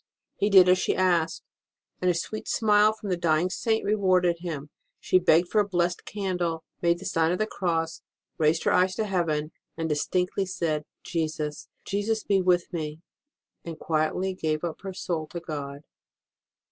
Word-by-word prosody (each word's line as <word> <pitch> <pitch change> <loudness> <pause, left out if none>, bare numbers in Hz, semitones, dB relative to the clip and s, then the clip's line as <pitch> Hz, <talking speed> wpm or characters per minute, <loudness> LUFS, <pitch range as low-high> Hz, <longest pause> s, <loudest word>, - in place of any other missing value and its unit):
He 205 - +1
did 190 -3 +8
as 180 0 +5
she - - 0
asked, 170 -3 +1 0.6
and 180 - +2
a 175 - +2
sweet 215 +6 -4
smile 210 -1 +4
from 215 -2 -8
the 180 - +1
dying 170 +1 +1
Saint 220 +1 0
rewarded 185 -4 +2
him. 150 -4 -6 0.3
She 185 - +3
begged 175 -1 +4
for 215 - +3
a 205 - -2
blessed 175 -1 0
candle, 180 -5 -2 0.2
made 170 0 +3
the 190 - -10
sign 165 -2 +1
of 180 - 0
the 215 - +1
Cross, 165 -5 -2 0.4
raised 160 +1 +2
her - - +2
eyes 185 +1 +3
to 220 - -1
heaven, 165 -6 -1 0.3
said 165 -1 -2
distinctly 180 +5 0 0.6
Jesus! 155 -3 -3 0.2
Jesus! 210 +2 -1
be 195 -2 +2
with 180 -1 +1
me! 155 -1 -4 0.6
and 165 -2 -7
quietly 165 +4 0
gave 155 -4 -2
up 170 -2 -4
her 195 - -5
soul 165 -5 -3
to 170 - -6
God. 145 -4 -6
175 Hz, 170 wpm, -26 LUFS, 160-190 Hz, 0.6 s, did